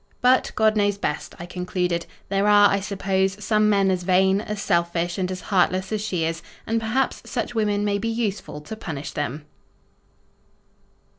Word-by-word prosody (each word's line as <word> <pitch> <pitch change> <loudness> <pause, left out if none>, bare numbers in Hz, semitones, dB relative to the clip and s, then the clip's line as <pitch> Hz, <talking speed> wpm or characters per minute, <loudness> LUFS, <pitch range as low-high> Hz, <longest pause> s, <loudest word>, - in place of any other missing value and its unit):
But, 255 +1 +3
God 220 0 +3
knows 205 -1 +2
best, 150 -6 -3
I 170 - -7
concluded. 180 -1 -2 0.2
There 195 +1 +1
are, 205 0 +6
I 200 - +2
suppose, 195 -1 -1
some 215 -1 +3
men 195 -2 +3
as 185 -1 0
vain, 190 +2 +3
as 210 -1 -5
selfish, 170 -1 0
and 180 -1 -1
as 185 0 -5
heartless 185 -1 +1
as 215 -1 -1
she 180 -6 -1
is, 165 0 -2 0.2
and, 225 +1 0
perhaps, 235 +4 -1
such 240 0 -3
women 210 -2 +1
may 200 -1 0
be 230 +3 -2
useful 210 -9 -3
to 220 +9 -7
punish 160 -9 -6
them. 145 +1 -4
195 Hz, 170 wpm, -23 LUFS, 180-215 Hz, 0.2 s, are